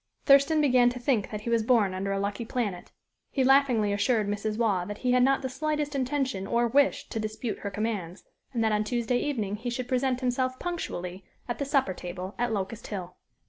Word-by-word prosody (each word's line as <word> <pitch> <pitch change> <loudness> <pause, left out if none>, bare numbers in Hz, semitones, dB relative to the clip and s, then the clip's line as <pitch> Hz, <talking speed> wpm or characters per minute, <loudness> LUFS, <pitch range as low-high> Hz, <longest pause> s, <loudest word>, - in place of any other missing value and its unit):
Thurston 280 +3 +5
began 250 -4 +5
to 250 +1 -6
think 240 -4 +1
that 210 -1 -5
he 235 - -3
was 230 -1 +3
born 220 -4 +3
under 195 +1 -2
a 195 - 0
lucky 200 +3 -2
planet. 215 -6 -3 0.4
He 265 - 0
laughingly 255 -6 +4
assured 215 +1 +1
Mrs. 210 +1 -2
Waugh 210 -6 +1
that 205 +1 -6
he 250 - 0
had 250 0 +4
not 270 +2 +3
the - - 0
slightest 300 +2 -2
intention 260 -7 -1
or 235 +2 +2
wish 280 +4 +2
to 225 - -3
dispute 215 +1 -4
her 200 - -4
commands, 200 -4 -3 0.3
and 235 -4 0
that 220 - +2
on 210 0 +2
Tuesday 240 +2 0
evening 215 -9 -2
he 240 +3 -4
should 245 +1 -3
present 255 0 0
himself 255 +1 0
punctually 190 - -4 0.2
at 240 - -3
the 280 - -1
supper 275 -8 +1
table 180 +2 -6
at 240 -1 0
Locust 210 +2 -3
Hill. 180 -3 -6
235 Hz, 210 wpm, -28 LUFS, 205-255 Hz, 0.4 s, Thurston